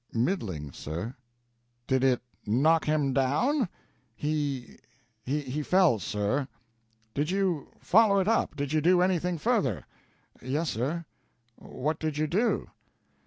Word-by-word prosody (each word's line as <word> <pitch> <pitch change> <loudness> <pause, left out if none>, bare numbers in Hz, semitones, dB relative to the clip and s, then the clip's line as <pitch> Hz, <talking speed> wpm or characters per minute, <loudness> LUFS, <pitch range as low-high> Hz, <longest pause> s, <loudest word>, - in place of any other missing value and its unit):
"Middling, 110 - -1
sir." 85 - -5 0.7
"Did 130 0 +1
it 125 -3 +3 0.2
knock 150 +10 +3
him 150 -3 +1
down?" 180 - +2 0.5
"He 145 -3 -2 0.5
he 145 +1 -2
fell, 180 - +4
sir." 105 +8 -1 0.7
"Did 145 +3 -1
you 185 -6 0
follow 210 0 +5
it 190 - 0
up? 225 -8 +1
Did 145 0 -3
you 155 - +3
do 175 +3 +4
anything 180 -1 +1
further?" 160 - 0 0.6
"Yes, 150 +5 -1
sir." 150 +9 -2 0.5
"What 150 +4 -4
did 155 -2 -2
you 155 - +1
do?" 200 +10 0
150 Hz, 120 wpm, -28 LUFS, 130-180 Hz, 0.7 s, follow